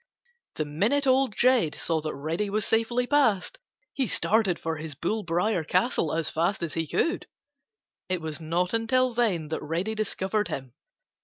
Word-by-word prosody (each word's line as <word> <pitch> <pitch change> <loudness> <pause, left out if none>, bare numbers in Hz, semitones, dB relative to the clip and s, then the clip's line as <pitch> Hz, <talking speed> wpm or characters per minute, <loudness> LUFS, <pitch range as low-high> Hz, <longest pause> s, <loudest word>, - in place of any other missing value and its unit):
The 155 - -1
minute 210 - +1
Old 260 -4 +3
Jed 245 -11 +3
saw 160 -2 -1
that 155 0 -4
Reddy 160 +8 -2
was 210 +1 0
safely 235 +2 +1
past, 275 - +2 0.3
he 265 -3 0
started 210 -6 +2
for 160 0 -3
his 155 -2 -6
bull 205 +9 -1
briar 175 +1 0
castle 165 - +1
as 160 -1 0
fast 170 +3 0
as 165 - -3
he 165 -1 -2
could. 335 - 0 0.8
It 185 -1 0
was 160 0 -5
not 175 +4 0
until 245 +2 +2
then 195 -10 0
that 160 - -3
Reddy 170 +8 -2
discovered 210 -2 -1
him. 135 -6 -6
190 Hz, 165 wpm, -27 LUFS, 160-230 Hz, 0.8 s, Old